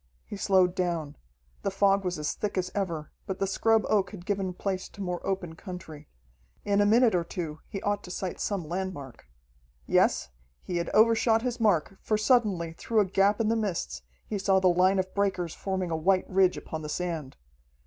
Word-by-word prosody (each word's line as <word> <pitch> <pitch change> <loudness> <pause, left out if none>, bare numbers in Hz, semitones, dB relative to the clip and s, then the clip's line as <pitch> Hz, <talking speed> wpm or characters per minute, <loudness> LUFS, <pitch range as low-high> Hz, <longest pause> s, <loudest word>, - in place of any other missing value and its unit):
He - - -7
slowed 190 -2 +3
down. 170 -5 -2 0.5
The - - 0
fog 195 0 +3
was 180 -2 -2
as 150 0 -2
thick 210 -2 -3
as 180 0 -1
ever, 170 -6 -3 0.2
but 190 - -3
the 195 - 0
scrub 225 +3 +2
oak 205 -3 +2
had 185 -4 -10
given 195 -2 -1
place 185 +1 -3
to 200 - -11
more 180 -1 -3
open 190 -4 -2
country. 165 -5 -9 0.6
In 205 0 +3
a 205 - +4
minute 230 +2 +5
or 175 -2 +2
two 165 -3 -5
he 195 - -6
ought 205 0 0
to - - -10
sight 185 0 -4
some 195 -6 -2
landmark. 170 - -5 0.6
Yes, - - +2 0.3
he 180 - -3
had 170 - -2
overshot 225 +1 +4
his 245 -1 -2
mark, 195 -4 +2
for 215 - +1
suddenly, 210 -8 +2
through 220 +6 0
a - - +2
gap 195 +2 +2
in 220 -1 +1
the 230 - +2
mists, 170 - -2 0.2
he 205 - -3
saw 190 0 +3
the 185 -1 +4
line 185 +2 +4
of 185 0 -1
breakers 190 -4 0
forming 190 -3 -3
a - - +1
white 185 +4 +2
ridge 185 -1 +3
upon 160 - -6
the 150 - -6
sand. 160 -5 -4
190 Hz, 200 wpm, -28 LUFS, 175-205 Hz, 0.6 s, minute